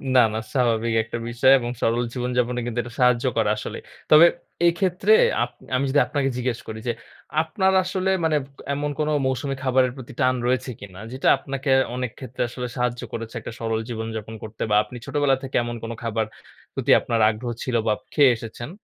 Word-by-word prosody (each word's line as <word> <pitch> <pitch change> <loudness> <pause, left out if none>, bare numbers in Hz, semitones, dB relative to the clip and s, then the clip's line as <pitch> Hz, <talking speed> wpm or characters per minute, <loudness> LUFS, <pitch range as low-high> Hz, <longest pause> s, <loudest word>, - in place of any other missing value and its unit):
না, - - +8
না। 110 - -1
স্বাভাবিক 115 -3 +1
একটা 115 +1 -5
বিষয় 120 +3 +4
এবং 120 - -4
সরল 120 +2 +2
জীবনযাপনে 125 -1 -1
কিন্তু 120 0 -2
এটা 120 0 -10
সাহায্য 125 0 +4
করা, 110 -2 +2
আসলেই। 105 - -6 0.3
তবে 155 +2 +9 0.4
এইক্ষেত্রে 180 - +2 0.3
আপ - - -3 0.3
আমি 130 +2 +1
যদি 145 - +3
আপনাকে 135 0 0
জিজ্ঞেস 125 -2 -1
করি 110 0 -6
যে, - - +3 0.5
আপনার 190 +4 +1
আসলে 185 +1 -1
মানে 160 -1 +2 0.4
এমন 145 +1 -2
কোনো 155 0 +1
মৌসুমী 130 +1 -1
খাবারের 130 -1 +3
প্রতি 130 +1 -9
টান 130 -2 +3
রয়েছে 130 +1 0
কিনা, 95 -2 -11
যেটা 130 +1 -2
আপনাকে 135 +1 -5 0.3
অনেক 125 -2 -3
ক্ষেত্রে 130 -1 -6
আসলে 125 +1 -5
সাহায্য 125 -1 -1
করেছে 115 -1 -6
একটা - - -8
সরল 115 -1 -1
জীবনযাপন 110 -1 -5
করতে 110 0 -9
বা - - +5
আপনি 125 - -10
ছোটবেলা 145 -2 +2
থেকে 130 - -6
এমন 120 0 -4
কোনো 115 0 -4
খাবার, 115 -1 0 0.5
প্রতি - - 0
আপনার 115 -1 -1
আগ্রহ 120 +2 -4
ছিল 125 - -2
বা 110 - +2
আপ - - -17
খেয়ে 140 -4 +6
এসেছেন? 115 +3 -8
125 Hz, 190 wpm, -23 LUFS, 115-135 Hz, 0.5 s, তবে